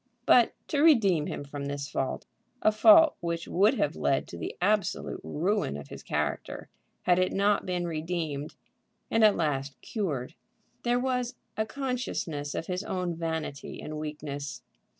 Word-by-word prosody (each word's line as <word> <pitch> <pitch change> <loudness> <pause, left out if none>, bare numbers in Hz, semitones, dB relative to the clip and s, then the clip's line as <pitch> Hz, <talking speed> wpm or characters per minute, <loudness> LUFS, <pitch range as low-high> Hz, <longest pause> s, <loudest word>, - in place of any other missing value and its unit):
But, - - +6 0.2
to 290 -3 +1
redeem 200 - +5
him - - -4
from 140 0 -6
this 140 0 -3
fault, 135 -3 -3 0.4
a 215 - +6
fault 320 +8 +7
which 170 -1 -3
would 205 +8 +4
have 150 - 0
led 135 - +1
to 85 - -7
the - - -5
absolute 205 +1 0
ruin 185 - 0
of 70 -1 -10
his - - -8
character 75 -1 -3 0.3
had 180 0 +4
it 185 - +2
not 200 0 +2
been 180 -1 -1
redeemed 155 -3 -3 0.6
and 225 - +3
at 210 -2 +7
last 140 -3 -1
cured, 150 - -3 0.5
there 240 0 +2
was 250 -1 -1 0.2
a 220 0 -1
consciousness 245 - -3
of - - -3
his 180 +2 -3
own 180 -4 -2
vanity 160 -3 -4
and 155 0 -6
weakness. 145 -3 -5
170 Hz, 155 wpm, -28 LUFS, 145-215 Hz, 0.6 s, fault